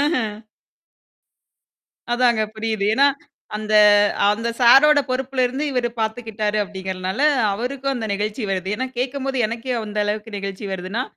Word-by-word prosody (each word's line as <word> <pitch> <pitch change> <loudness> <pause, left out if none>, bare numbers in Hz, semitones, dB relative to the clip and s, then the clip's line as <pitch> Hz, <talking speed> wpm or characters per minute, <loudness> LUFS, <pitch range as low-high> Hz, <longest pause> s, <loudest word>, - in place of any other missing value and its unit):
ஆஹ. 290 -3 +1 1.9
அதாங்க 240 -2 +2
புரியுது. 220 -2 -2
ஏன்னா, 280 +3 +5 0.5
அந்த 215 0 -3 0.6
அந்த 230 +3 -2
சாரோட 275 +5 +7
பொறுப்புல 260 0 -1
இருந்து 265 +4 -4
இவரு 245 -2 0
பாத்துக்கிட்டாரு 220 -1 -2
அப்பிடிங்கிறனால 190 0 -5 0.3
அவருக்கும் 265 +6 -3
அந்த 225 -2 -4
நெகிழ்ச்சி 210 +3 -3
வருது. 190 0 -3
ஏன்னா, 260 0 -2
கேக்கும்போது 270 +1 -2
எனக்கே 235 +3 -4
அந்த 210 0 -4
அளவுக்கு 210 +1 -4
நெகிழ்ச்சி 195 0 -6
வருதுன்னா, 190 +7 -3
225 Hz, 125 wpm, -21 LUFS, 210-255 Hz, 1.9 s, சாரோட